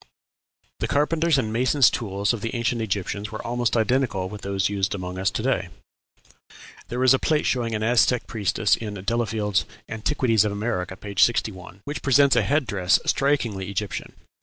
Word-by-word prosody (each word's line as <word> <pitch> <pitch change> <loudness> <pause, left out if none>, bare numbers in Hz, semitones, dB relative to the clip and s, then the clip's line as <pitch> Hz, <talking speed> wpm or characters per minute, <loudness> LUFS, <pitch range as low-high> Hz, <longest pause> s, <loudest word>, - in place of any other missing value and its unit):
The - - -1
carpenters' 155 +2 +2
and 110 -5 -1
masons' 130 +3 +4
tools 100 -1 -1
of 115 - -5
the 115 - -4
ancient 120 0 -1
Egyptians 100 0 -3
were 110 - -7
almost 120 0 0
identical 110 -5 0
with 105 0 -8
those 100 0 0
used 100 -1 -1
among 90 -1 -6
us 95 0 +1
to 110 - -4
day. 95 -9 0 1.2
There 125 +2 -2
is 130 0 +6
a 130 - +2
plate 155 -2 +1
showing 115 -3 0
an 110 - -2
Aztec 120 +1 +3
priestess 105 -1 +1
in 105 -2 -6
Delafield's 105 0 -1 0.2
"Antiquities 115 -1 +1
of 105 - -1
America," 95 -3 -3
p. 100 -1 -8
61, 95 -5 +1
which 145 - -5
presents 140 0 +4
a 125 - +4
head 145 +7 +1
dress 95 -4 +2
strikingly 115 -9 0
Egyptian. 100 +1 -4
110 Hz, 170 wpm, -24 LUFS, 100-125 Hz, 1.2 s, is